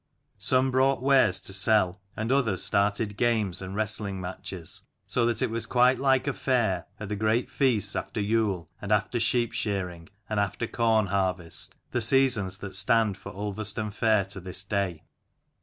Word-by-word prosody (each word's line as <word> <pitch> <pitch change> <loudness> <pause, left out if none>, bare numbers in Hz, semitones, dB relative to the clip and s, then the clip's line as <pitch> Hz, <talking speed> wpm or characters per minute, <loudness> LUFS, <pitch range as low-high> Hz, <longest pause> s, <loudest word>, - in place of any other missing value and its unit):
Some 130 0 +3
brought 130 0 +2
wares 130 -9 +4
to 95 - -4
sell, 95 -1 +2 0.2
and 110 +3 -2
others 120 -9 +2
started 105 +1 +1
games 110 -7 +1
and 95 +1 -6
wrestling 105 -2 -2
matches: 90 -1 -6 0.2
so 120 -2 +1
that 120 +2 0
it 125 - -1
was 115 0 -3
quite 125 +1 +3
like 135 -1 +2
a 140 - 0
fair, 110 -12 0
at 105 - -6
the 105 - -3
great 110 +3 0
feasts 125 -8 +1
after - - -4
Yule 100 -4 0
and 105 - -5
after 105 +3 +1
sheep 120 +1 +1
shearing, 90 -5 -3 0.2
and 110 -1 -1
after 100 +3 -1
corn 110 -2 +2
harvest, 95 -3 -2 0.2
the 120 - 0
seasons 115 -6 +3
that 95 -1 -8
stand 105 +1 +2
for 100 - -10
Ulverston 105 +1 -2
fair 110 -1 +2
to 100 +1 -7
this 90 +1 -3
day. 95 -4 -2
105 Hz, 170 wpm, -27 LUFS, 95-115 Hz, 0.2 s, wares